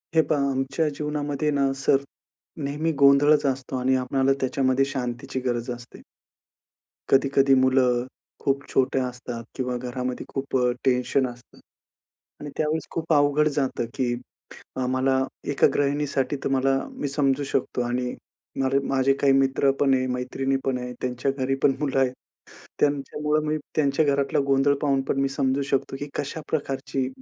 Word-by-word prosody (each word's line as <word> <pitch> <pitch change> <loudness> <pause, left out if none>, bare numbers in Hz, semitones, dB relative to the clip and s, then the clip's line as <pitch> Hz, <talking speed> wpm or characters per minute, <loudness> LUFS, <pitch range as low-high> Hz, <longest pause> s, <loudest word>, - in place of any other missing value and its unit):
हे 160 - +7
पहा, 140 -2 +2
आमच्या 135 +4 0
जीवनामध्ये 150 0 -1
ना, 140 -1 +2
सर 135 0 +2 0.6
नेहमी 150 +4 -1
गोंधळचं 140 +1 +5
असतो 130 0 -6
आणि 130 +1 +2
आपणाला 135 +1 +1
त्याच्यामध्ये 130 0 +2
शांतीची 130 -2 -4
गरज 120 0 -1
असते. 120 0 -9 1.1
कधी-कधी 135 0 +4
मुलं 130 -2 +3 0.4
खूप 140 +1 +1
छोट्या 130 0 +2
असतात 125 -1 -7
किंवा 125 -1 -2
घरामध्ये 125 0 -4
खूप 135 -1 -2
अ, 125 -1 +2
टेन्शन 130 +1 +2
असतं 120 0 -13 0.8
आणि 145 - -6
त्यावेळेस 155 +1 -1
खूप 165 0 -1
अवघड 145 +1 +4
जातं, 135 -4 -1
की 125 -2 0 0.6
अ, 130 - -1
मला 130 +1 +1 0.3
एका 140 - +4
गृहिणीसाठी 145 -1 0
तुम्हाला 135 0 +2
मी 145 - -3
समजू 140 0 +1
शकतो 130 -2 -1
आणि 125 +1 -2 0.5
मला 135 +1 +2
माझे 135 0 +3
काही 140 -1 +4
मित्र 135 0 +3
पण 135 -2 +4
आहे, 130 0 +1
मैत्रिणी 130 +2 -1
पण 130 -2 0
आहे 125 0 -5
त्यांच्या 125 +2 -1
घरी 130 +1 0
पण 135 - +4
मुलं 140 -3 0
आहेत. 130 -1 +2 0.7
त्यांच्यामुळे 150 +2 0
मी 155 - 0 0.2
त्यांच्या 145 +1 +2
घरातला 140 -1 +1
गोंधळ 135 +1 +4
पाहून 140 -2 +2
पण - - +1
मी 135 - +1
समजू 135 0 0
शकतो, 135 0 0
की 145 - -4
कशा 145 +3 -3
प्रकारची 135 -3 -2
135 Hz, 150 wpm, -25 LUFS, 130-140 Hz, 1.1 s, हे